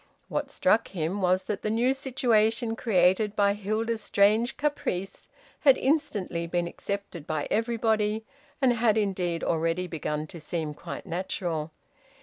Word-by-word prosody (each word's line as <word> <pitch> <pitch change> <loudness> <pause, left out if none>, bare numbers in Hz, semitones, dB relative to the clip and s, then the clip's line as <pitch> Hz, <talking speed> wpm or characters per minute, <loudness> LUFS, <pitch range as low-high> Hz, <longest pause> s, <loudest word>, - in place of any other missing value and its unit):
What - - -2
struck 230 -5 +2
him 180 +2 -2
was 185 0 +2
that 205 +1 -3
the 215 - -1
new 240 +4 +2
situation 235 -4 +1
created 200 -1 +2
by 200 0 +3
Hilda's 215 +2 -2
strange 210 +5 +3
caprice 235 -10 -2 0.3
had 275 -3 +6
instantly 210 - 0
been 175 0 0
accepted 200 -4 -5
by 155 -2 -2
everybody, 220 -1 +1 0.3
and 260 -3 +4
had 225 -2 +2
indeed 185 -5 -1
already 165 +2 0
begun 150 -3 -3
to 165 +2 -10
seem 155 -1 -3
quite - - -8
natural. 170 -3 -3
205 Hz, 135 wpm, -27 LUFS, 175-225 Hz, 0.3 s, had